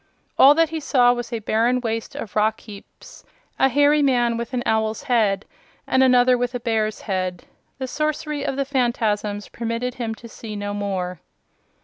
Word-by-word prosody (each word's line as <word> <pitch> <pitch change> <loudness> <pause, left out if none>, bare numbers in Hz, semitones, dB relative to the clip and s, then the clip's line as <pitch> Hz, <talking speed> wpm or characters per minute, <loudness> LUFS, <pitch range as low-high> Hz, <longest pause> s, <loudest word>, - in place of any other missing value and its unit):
All 280 +2 +7
that 330 0 +3
he 320 0 -3
saw 250 -4 +3
was 240 -1 -5
a 235 - -1
barren 230 +3 +1
waste 225 -2 -4
of 210 - -7
rock 215 +1 +1
heaps, 205 -3 -13 0.4
a 270 - +4
hairy 290 +3 +4
man 245 -4 +2
with 235 0 -5
an 250 -2 -2
owl's 220 0 0
head 215 -7 +1 0.4
and 260 - +2
another 250 -1 +5
with 245 0 -2
a - - -2
bear's 220 -2 -1
head. 185 -3 -3 0.3
The 260 -1 -4
sorcery 300 +1 -2
of 270 - -2
the 275 0 -1
Phanfasms 225 -6 -1
permitted 235 +2 -3
him 225 -1 -2
to 235 - -12
see 220 -1 -8
no 205 0 -4
more. 190 -3 -3
235 Hz, 175 wpm, -22 LUFS, 215-260 Hz, 0.4 s, All